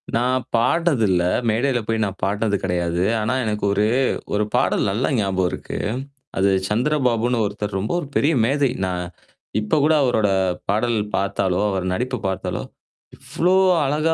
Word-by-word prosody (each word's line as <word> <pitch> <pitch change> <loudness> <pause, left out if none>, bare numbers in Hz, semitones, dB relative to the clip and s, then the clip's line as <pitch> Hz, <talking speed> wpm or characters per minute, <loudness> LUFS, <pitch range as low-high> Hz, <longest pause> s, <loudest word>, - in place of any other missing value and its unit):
நான் 125 +2 +1
பாட்னது 135 +2 +2
இல்ல. 90 -2 +2 0.3
மேடையில 120 +3 +1
போய் 115 -1 0
நான் 100 -1 -6
பாட்டுனது 100 +1 0
கெடையாது. 85 -1 -1 0.2
ஆனா, 110 +4 0
எனக்கு 105 -1 -2
ஒரு 105 +1 +2 0.5
ஒரு 105 +1 +2
பாடல் - - +2
நல்லா 110 +6 0
ஞாபகம் 95 -3 +1
இருக்கு. - - -6 0.6
அது 95 +1 +3 0.2
சந்திரபாபுன்னு 120 -1 +1
ஒருத்தர் 105 -1 -3
ரொம்ப 105 +4 -3
ஒரு 150 - -6
பெரிய 150 +4 +3
மேதை. 140 +2 +2 0.2
நான் 90 -1 -2 0.6
இப்ப 105 +8 0
கூட 155 +2 +4
அவரோட 110 -5 +2 0.4
பாடல் 110 +3 +1 0.2
பாத்தாலோ, 95 -2 0
அவர் 95 -1 -2
நடிப்பு 125 +7 -2
பாத்தாலோ! 95 0 -3 0.5
இவ்ளோ 180 +3 0 0.3
அழகா 155 +4 +1
110 Hz, 145 wpm, -21 LUFS, 100-130 Hz, 0.6 s, கூட